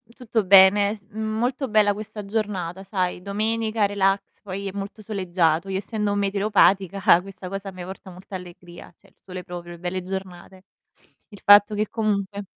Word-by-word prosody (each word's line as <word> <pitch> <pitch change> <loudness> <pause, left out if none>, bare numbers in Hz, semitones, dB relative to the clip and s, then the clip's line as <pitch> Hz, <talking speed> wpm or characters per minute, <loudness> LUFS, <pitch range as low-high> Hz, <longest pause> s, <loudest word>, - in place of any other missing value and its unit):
Tutto 225 -3 -1
bene. 200 +2 +6
S 200 - -20
mhmm, 220 0 -3
molto 255 +3 -1
bella 210 -2 +3
questa 210 0 -8
giornata, 195 -4 -3
sai, 185 -3 -2
domenica, 215 +2 0
relax, 195 0 -1
poi 200 0 -6
è - - -4
molto 200 +2 -7
soleggiato. 180 -4 0
Io 190 - -1
essendo 210 +1 -2
meteoropatica 195 -2 +3
questa 195 -1 -10
cosa 195 +1 -5
a - - -9
me 185 -1 -9
porta 190 +1 -9
molta 185 +2 -10
allegria, 175 -1 -11
cioè 200 - -24
il - - -35
sole 185 -1 -9
proprio, 175 -1 -8
belle 180 +2 -4
giornate. 190 0 -8 0.7
Il 205 -3 -14
fatto 205 +1 +7
che 210 +1 0
comunque 205 -2 -2
195 Hz, 165 wpm, -23 LUFS, 185-210 Hz, 0.7 s, fatto